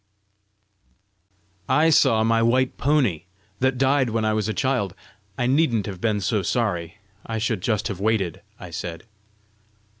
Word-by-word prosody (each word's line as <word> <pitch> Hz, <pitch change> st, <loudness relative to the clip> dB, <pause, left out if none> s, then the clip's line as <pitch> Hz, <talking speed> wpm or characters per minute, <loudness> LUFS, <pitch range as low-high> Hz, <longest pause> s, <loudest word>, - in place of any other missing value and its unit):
"I 150 Hz, +5 st, +4 dB
saw 110 Hz, -7 st, +4 dB
my 115 Hz, 0 st, +2 dB
white 125 Hz, +3 st, +2 dB
pony, 130 Hz, -, +1 dB, 0.3 s
that 130 Hz, 0 st, +1 dB
died 135 Hz, -1 st, +2 dB
when 110 Hz, 0 st, -1 dB
I 110 Hz, -, +1 dB
was 110 Hz, -1 st, -1 dB
a -, -, +1 dB
child. 125 Hz, -9 st, -1 dB, 0.4 s
I 120 Hz, -, 0 dB
needn't 125 Hz, -5 st, +2 dB
have 95 Hz, -4 st, -7 dB
been 105 Hz, -3 st, 0 dB
so 110 Hz, 0 st, 0 dB
sorry; 90 Hz, -4 st, -2 dB, 0.3 s
I 115 Hz, -, -4 dB
should 110 Hz, -3 st, -1 dB
just 110 Hz, +1 st, 0 dB
have 100 Hz, -5 st, -5 dB
waited!" 100 Hz, -5 st, 0 dB, 0.2 s
I 90 Hz, -2 st, -9 dB
said. 85 Hz, 0 st, -6 dB
110 Hz, 150 wpm, -23 LUFS, 100-130 Hz, 0.4 s, I